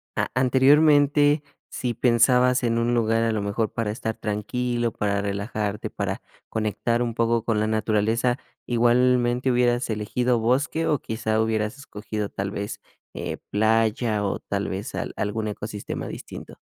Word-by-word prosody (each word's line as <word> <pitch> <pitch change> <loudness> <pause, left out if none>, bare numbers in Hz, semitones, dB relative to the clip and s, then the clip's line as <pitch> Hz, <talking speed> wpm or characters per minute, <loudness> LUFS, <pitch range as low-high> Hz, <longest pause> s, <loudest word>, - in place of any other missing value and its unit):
a - - -1
anteriormente, 145 +3 +4 0.3
si 125 -2 -3
pensabas 125 +2 +3
en 115 -1 +1
un 120 +1 +1
lugar, 115 -1 +2
a 115 - +1
lo 105 -2 -1
mejor 100 +2 -1
para 110 -2 -1
estar 110 0 -3
tranquilo, 120 +3 -2
para 100 -1 -1
relajarte, 100 +1 -3
para - - -3 0.3
conectar 110 +2 0
un 115 - -2
poco 115 0 +1
con 110 -2 +1
la 110 - +1
naturaleza, 110 +3 +1 0.3
¿igualmente 120 +1 +2
hubieras 120 0 +2
elegido 120 +3 0
bosque 135 +8 +1
o 150 - +2
quizá 110 -2 -2
hubieras 110 +1 0
escogido 105 -5 -5
tal 100 0 -3
vez, 100 +1 -5 0.3
eh, - - -4
playa 110 0 +2
o 100 - -2
tal 100 0 -3
vez 100 +7 -5
al - - -4
algún 110 +1 -2
ecosistema 105 0 -5
distinto? - - -9
115 Hz, 145 wpm, -24 LUFS, 105-125 Hz, 0.3 s, anteriormente